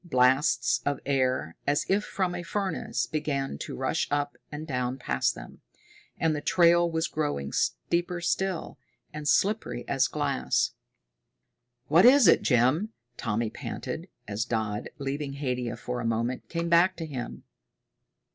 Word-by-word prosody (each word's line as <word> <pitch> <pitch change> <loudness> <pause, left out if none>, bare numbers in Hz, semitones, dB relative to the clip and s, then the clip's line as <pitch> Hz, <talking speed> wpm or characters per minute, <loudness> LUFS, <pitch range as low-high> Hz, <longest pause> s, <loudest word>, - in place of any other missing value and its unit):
Blasts 130 -4 +3
of 145 0 -1
air, 130 - 0
as 145 +1 +2
if 200 +2 +2
from 185 -3 -1
a 175 - -4
furnace, 195 +2 -2
began 140 - -2
to - - -5
rush - - -1
up 145 0 -1 0.2
and 150 +1 -5
down 125 -3 -2
past 125 - 0
them. - - -11 0.6
And 160 -1 +1
the 145 - -3
trail 170 +1 +4
was 160 -1 0
growing 145 - -2
steeper 170 - 0
still, 185 0 -2 0.3
and 150 -1 -5
slippery 195 - +1
as 135 0 +2
glass. 145 -3 0 1.2
"What 165 +7 +6
is 265 -4 +7
it, - - +6
Jim?" 140 - +2 0.2
Tommy 115 0 -1
panted, - - -6 0.2
as 105 +2 -1
Dodd, 110 -3 -2
leaving 140 0 -3
Haidia 125 -4 -2
for 125 0 -4
a - - -3
moment, 115 +2 -1
came 170 0 -2
back 170 +3 +4
to 165 - -5
him. 130 -6 -6
145 Hz, 145 wpm, -28 LUFS, 125-170 Hz, 1.2 s, is